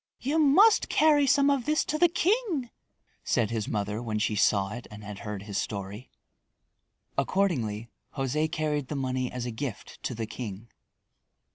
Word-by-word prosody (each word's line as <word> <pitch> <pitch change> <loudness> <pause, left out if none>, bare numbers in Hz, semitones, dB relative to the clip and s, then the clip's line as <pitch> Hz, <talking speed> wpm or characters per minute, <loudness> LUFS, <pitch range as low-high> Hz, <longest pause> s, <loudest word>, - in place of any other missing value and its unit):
"You 290 +5 0
must 365 +10 +5
carry 295 -2 +4
some 280 +2 +4
of 275 -4 0
this 305 +1 +1
to 305 - -2
the 345 - +6
king," 345 - 0 0.5
said 115 -2 +1
his 110 -2 -2
mother 105 +1 -2
when 110 -3 -2
she 105 0 0
saw 100 -1 +2
it 120 - -8
and 105 -1 -11
had 105 -1 -8
heard 105 -3 -6
his 100 -1 -3
story. 100 +3 -5 1.1
Accordingly, 125 - 0 0.3
José 150 +4 0
carried 150 -3 -1
the 150 - -4
money 130 -2 -2
as 125 -1 -4
a 120 - -3
gift 115 0 -6
to 125 - -3
the 110 0 -3
king. 110 -1 -7
130 Hz, 165 wpm, -28 LUFS, -, 1.1 s, the